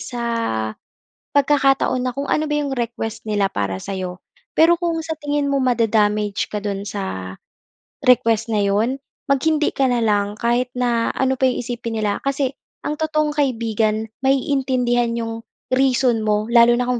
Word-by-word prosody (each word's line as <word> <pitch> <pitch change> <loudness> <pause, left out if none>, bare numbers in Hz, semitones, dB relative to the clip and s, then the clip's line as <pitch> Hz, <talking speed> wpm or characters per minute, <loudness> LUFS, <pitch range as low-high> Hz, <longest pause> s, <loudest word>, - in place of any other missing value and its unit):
sa 240 -1 -5 1.1
pagkakataon 275 -3 +2
na 255 - 0
kung 275 +3 -4
ano 305 +1 0
ba 295 - +1
'yong 280 -2 -1
request 235 -2 -4
nila 205 -1 +2
para 100 - -2
sa'yo. 185 - -5 0.4
Pero 330 +2 +7
kung 340 -1 -1
sa 320 - -2
tingin 290 -1 0
mo 280 -1 +1
mada-damage 215 -4 +1
ka 210 - -2
do'n 200 -1 -3
sa 190 - -5 0.7
request 230 -2 +3
na 210 - +2
'yon, 215 +7 +1 0.3
mag 275 - +4
hindi 310 -1 +2
ka 270 -1 +1
na 240 -2 +1
lang 205 -1 +1
kahit 240 +2 +1
na 240 -2 +1
ano 265 -1 0
pa 260 - +4
'yong 250 -1 -1
isipin 230 -2 -4
nila 205 -1 0
kasi, 275 -1 -1 0.3
ang 300 +1 -3
totoong 305 -1 +1
kaibigan 225 -6 0
maiintindihan 255 -3 +1
'yong 225 -1 -3 0.3
reason 255 -3 +3
mo 215 +1 0
lalo 235 0 +6
na 245 - 0
kung 245 -1 -1
240 Hz, 160 wpm, -21 LUFS, 215-270 Hz, 1.1 s, Pero